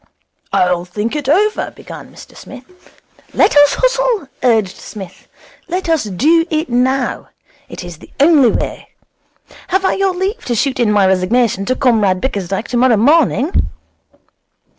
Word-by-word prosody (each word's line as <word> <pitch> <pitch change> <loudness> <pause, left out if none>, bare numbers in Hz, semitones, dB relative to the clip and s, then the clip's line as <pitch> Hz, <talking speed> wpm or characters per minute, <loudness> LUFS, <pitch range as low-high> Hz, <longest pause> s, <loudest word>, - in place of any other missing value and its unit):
'I'll 180 -1 +1
think 210 +8 -4
it 290 -3 -3
over 415 +7 +1
' - - -28
began - - -11
Mr - - -15
Smith. 265 -1 -12 0.7
'Let - - +3
us 290 0 +5
hustle,' - - 0
urged 220 -6 +1
Psmith. 195 -5 -11 0.4
'Let 360 +1 -3
us 320 -7 +1
Do 295 - +2
It 310 -2 -2
Now. 255 +1 -1 0.4
It - - -8
is 175 -2 -9
the - - -15
only 285 -4 +5
way. - - -4 0.8
Have 380 +1 0
I - - +2
your 385 -2 0
leave 390 +6 -3
to 240 - -1
shoot 265 +3 -1
in 230 -3 +2
my 205 -2 +3
resignation 195 +3 +1
to 255 - 0
Comrade 215 -9 +2
Bickersdyke 195 -2 -3
tomorrow 245 -1 +2
morning?' 285 - +2
255 Hz, 150 wpm, -15 LUFS, 210-325 Hz, 0.8 s, us